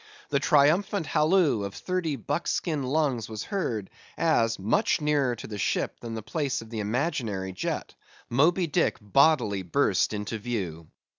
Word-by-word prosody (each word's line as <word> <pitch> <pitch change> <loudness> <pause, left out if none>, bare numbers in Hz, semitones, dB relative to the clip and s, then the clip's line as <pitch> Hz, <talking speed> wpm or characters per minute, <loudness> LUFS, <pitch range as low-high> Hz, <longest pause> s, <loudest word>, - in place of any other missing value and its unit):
The 140 - +2
triumphant 165 +8 +3
halloo 155 - +3
of 100 0 -5
thirty 180 -5 -2
buckskin 150 +2 -2
lungs 130 -4 0
was 110 -2 -5
heard, 115 - -3 0.3
as—much 115 - +2
nearer 145 -5 +1
to - - -9
the 105 -2 -6
ship - - -1
than 115 -1 -6
the 110 - -5
place 145 -1 -2
of 115 0 -11
the 115 - -4
imaginary 110 - -2
jet, 95 - -2
less - - -3
than - - -40
a - - -21
mile - - -31 0.3
ahead—Moby 175 +2 +2
Dick 165 +3 +1
bodily 110 -2 +3
burst 90 -3 +1
into 105 +1 -4
view! 95 -9 -4
125 Hz, 165 wpm, -27 LUFS, 105-155 Hz, 0.3 s, triumphant